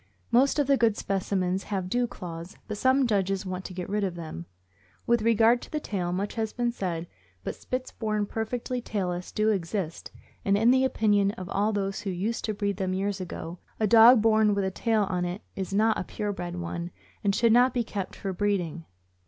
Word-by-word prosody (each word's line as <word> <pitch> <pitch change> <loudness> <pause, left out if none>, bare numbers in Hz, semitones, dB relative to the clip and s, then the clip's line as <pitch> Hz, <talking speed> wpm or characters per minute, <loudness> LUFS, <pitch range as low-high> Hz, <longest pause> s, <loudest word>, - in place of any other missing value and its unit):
Most 265 +5 +4
of 290 - +3
the 275 0 +3
good 230 -3 +2
specimens 190 -1 -1
have 190 -3 -2
dew 245 +5 +1
claws, 170 -2 -8
but 210 - -3
some 260 +1 +4
judges 195 -3 0
want 185 0 -4
to 185 - -6
get 180 -1 -4
rid 210 +1 -1
of 185 -3 -1
them. 155 - -7 0.6
With 235 -1 +3
regard 230 +2 +4
to - - -11
the 305 - -1
tail, 185 -10 -3
much 195 +3 -2
has 220 -1 -2
been 240 -1 0
said, 175 -7 -3 0.4
but - - -3
Spits 255 0 -4
born 215 -2 -1
perfectly 240 +4 -3
tailless 180 -6 -3
do 215 +1 +1
exist, 185 -3 -2 0.3
and 200 0 +3
in 225 +3 +5
the 260 0 +4
opinion 205 -5 +2
of 185 -3 -8
all 205 +2 +1
those 195 -2 -2
who 200 - -4
used 195 +6 -2
to 215 - -1
breed 200 -2 -1
them 185 -1 -1
years 195 0 -1
ago, 175 -1 -6 0.2
a 220 - +3
dog 225 +2 +8
born 215 -2 +4
with 200 -1 0
a 190 - -1
tail 220 +2 +1
on 180 -2 -2 0.2
is 190 -1 -4
not 215 +2 +3
a - - -2
pure 205 +3 -3
bred 175 -2 -5
one, 170 0 -4 0.3
and 200 -1 +2
should 230 -1 +4
not 250 +2 +5
be 245 -2 0
kept 200 -4 -5
for 195 -1 -4
breeding. 180 -5 -1
205 Hz, 210 wpm, -27 LUFS, 185-225 Hz, 0.6 s, dog